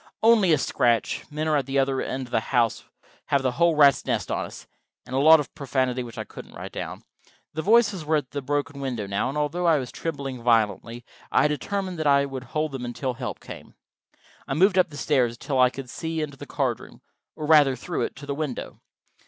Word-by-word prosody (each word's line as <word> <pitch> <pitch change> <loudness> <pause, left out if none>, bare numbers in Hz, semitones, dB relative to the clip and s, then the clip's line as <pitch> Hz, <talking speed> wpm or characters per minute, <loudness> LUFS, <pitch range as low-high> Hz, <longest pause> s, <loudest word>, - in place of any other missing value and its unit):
"Only 220 -6 +5
a 155 - +5
scratch.... 120 -4 0
Men 155 +1 -3
are 155 -1 +3
at 135 -2 -2
the 135 +1 -1
other 135 -1 +1
end 130 0 -3
of 120 - -16
the - - +2
house.... 115 -1 0 0.4
Have 140 -1 +1
the 130 - +1
whole 170 +4 +2
rat's 140 -3 +5
nest - - -2
on - - -1
us." - - -11 0.4
And 130 - -6
a - - +2
lot 160 +3 +8
of 145 - -5
profanity 130 -2 -1
which 120 -2 -9
I - - -4
won't - - -10
write - - -7
down. - - -6 0.5
The 160 - -2
voices 205 -3 +3
were 155 +1 +1
at 145 -4 -2
the 140 - -3
broken 145 +1 -2
window 125 -6 -3
now, 100 +5 -1
and 140 - -4
although 160 +4 0
I 160 -2 +5
was 130 -3 -4
trembling 140 -6 -5
violently, 115 0 +1 0.3
I - - +4
was 150 - +3
determined 185 +3 -3
that 155 - 0
I 140 0 +4
would 135 -2 -6
hold 155 +4 -2
them 135 -2 -5
until 125 +2 -3
help 115 - -5
came. - - -11 0.7
I 135 - -2
moved 190 +4 +4
up 180 - +3
the 145 - -10
stairs 130 -7 +1
until 135 +2 -2
I 125 0 +6
could 130 +1 -8
see 160 +5 -4
into 150 -2 -4
the - - -10
card - - -1
room, - - -15 0.3
or 155 - -5
rather 150 -4 +5
through 170 +7 -4
it, - - -2
to 140 - -10
the 140 - -3
window. 145 -3 -5
140 Hz, 230 wpm, -25 LUFS, 130-155 Hz, 0.7 s, lot